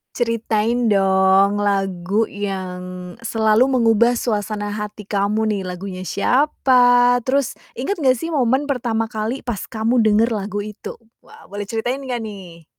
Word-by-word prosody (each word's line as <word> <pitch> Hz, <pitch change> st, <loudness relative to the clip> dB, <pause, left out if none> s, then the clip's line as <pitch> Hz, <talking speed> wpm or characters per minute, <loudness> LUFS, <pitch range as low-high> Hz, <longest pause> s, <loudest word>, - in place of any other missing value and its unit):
Ceritain, 230 Hz, 0 st, 0 dB
dong, 195 Hz, 0 st, +3 dB
lagu 195 Hz, +1 st, 0 dB
yang 180 Hz, -3 st, -6 dB
selalu 225 Hz, +3 st, +2 dB
mengubah 235 Hz, +1 st, +3 dB
suasana 205 Hz, -2 st, -2 dB
hati 210 Hz, 0 st, -6 dB
kamu 205 Hz, +2 st, 0 dB
nih. 210 Hz, -2 st, -1 dB
Lagunya 185 Hz, 0 st, -6 dB
siapa 245 Hz, -, +3 dB
terus 265 Hz, +2 st, 0 dB, 0.2 s
inget 270 Hz, +11 st, -1 dB
nggak 260 Hz, -2 st, +3 dB
sih 330 Hz, +7 st, -5 dB
momen 265 Hz, 0 st, +1 dB
pertama 235 Hz, -5 st, -1 dB
kali 220 Hz, +4 st, -4 dB
pas 235 Hz, -5 st, -3 dB
kamu 230 Hz, +2 st, +1 dB
denger 220 Hz, +2 st, +3 dB
lagu 205 Hz, 0 st, -3 dB
itu? 210 Hz, 0 st, -8 dB, 0.2 s
Wah -, -, -17 dB
boleh 205 Hz, +1 st, -7 dB
ceritain 240 Hz, +4 st, -2 dB
nggak 250 Hz, -3 st, -4 dB
nih? 180 Hz, -6 st, -10 dB
215 Hz, 135 wpm, -20 LUFS, 200-245 Hz, 0.2 s, dong